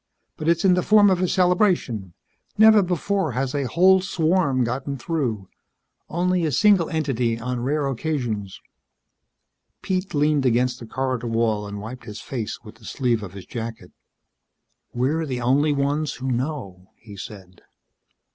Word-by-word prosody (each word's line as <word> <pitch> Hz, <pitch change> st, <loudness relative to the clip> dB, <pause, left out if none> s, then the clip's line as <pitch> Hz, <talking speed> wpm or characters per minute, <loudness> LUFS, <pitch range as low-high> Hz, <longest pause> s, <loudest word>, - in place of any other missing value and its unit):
But 155 Hz, -, -2 dB
it's 170 Hz, +3 st, +2 dB
in 185 Hz, -, +6 dB
the 180 Hz, -, +2 dB
form 205 Hz, 0 st, +5 dB
of 185 Hz, -1 st, +1 dB
a 185 Hz, -, +2 dB
celebration. 180 Hz, -, +1 dB, 0.4 s
Never 220 Hz, 0 st, +7 dB
before 185 Hz, -2 st, -1 dB
has 130 Hz, +1 st, -2 dB
a 140 Hz, -3 st, -1 dB
whole 185 Hz, +8 st, +5 dB
swarm 165 Hz, -7 st, +1 dB
gotten 135 Hz, +4 st, -3 dB
through. 120 Hz, -, -2 dB, 0.6 s
Only 180 Hz, +1 st, 0 dB
a 155 Hz, -, 0 dB
single 195 Hz, -, +4 dB
entity 130 Hz, -8 st, -1 dB
on 125 Hz, +1 st, -3 dB
rare 145 Hz, +3 st, 0 dB
occasions." 120 Hz, -8 st, -3 dB, 1.2 s
Pete 185 Hz, -2 st, -2 dB
leaned 145 Hz, -1 st, +2 dB
against 125 Hz, 0 st, +1 dB
the 115 Hz, -, -9 dB
corridor 130 Hz, -1 st, -2 dB
wall 115 Hz, -2 st, 0 dB
and 100 Hz, 0 st, -6 dB
wiped 120 Hz, +4 st, -8 dB
his 105 Hz, -2 st, -8 dB
face 120 Hz, -3 st, -5 dB
with 110 Hz, 0 st, -13 dB
the 115 Hz, -, -17 dB
sleeve 120 Hz, -3 st, 0 dB
of 95 Hz, -3 st, -8 dB
his 95 Hz, -2 st, -10 dB
jacket. 115 Hz, -1 st, -7 dB, 1.0 s
"We're 150 Hz, +6 st, -1 dB
the 125 Hz, -2 st, -3 dB
only 140 Hz, +5 st, +2 dB
ones 145 Hz, +2 st, -1 dB
who 130 Hz, +1 st, -3 dB
know," 120 Hz, -, -4 dB
he 105 Hz, -2 st, -13 dB
said. 95 Hz, -2 st, -10 dB
135 Hz, 155 wpm, -23 LUFS, 115-165 Hz, 1.2 s, Never